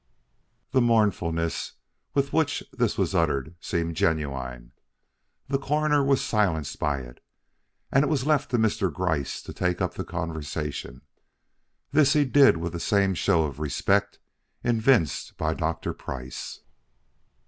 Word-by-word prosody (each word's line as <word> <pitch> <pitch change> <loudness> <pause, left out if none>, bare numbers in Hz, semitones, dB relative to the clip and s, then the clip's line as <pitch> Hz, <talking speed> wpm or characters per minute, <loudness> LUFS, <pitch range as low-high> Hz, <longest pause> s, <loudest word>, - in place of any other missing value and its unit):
The 130 -2 +3
mournfulness 95 -8 +1 0.4
with 140 -1 +1
which 160 -3 +1
this 120 -4 0
was 95 -2 0
uttered 75 -5 0
seemed 85 -1 -2
genuine. 65 -7 -2 0.8
The 135 0 0
Coroner 150 +1 +2
was 135 -1 +2
silenced 90 -9 0
by 70 -3 0
it, - - -13 0.7
and 135 - +4
it - - +1
was 140 -4 0
left 150 -3 +2
to 120 - +1
Mr. 110 -4 +1
Gryce 80 -3 -2
to - - -8
take 90 -1 -1
up - - -1
the - - -4
conversation. 75 -6 -5 0.9
This 145 0 +5
he 150 -2 +4
did 135 -6 +6
with 85 +1 -4
the 85 - -4
same 100 +1 +2
show 85 -2 +2
of 75 -1 -4
respect 75 -3 +1 0.5
evinced 115 - +2
by 80 0 0
Dr. 80 0 -2
Price. 65 -1 -7
90 Hz, 135 wpm, -26 LUFS, 80-130 Hz, 0.9 s, did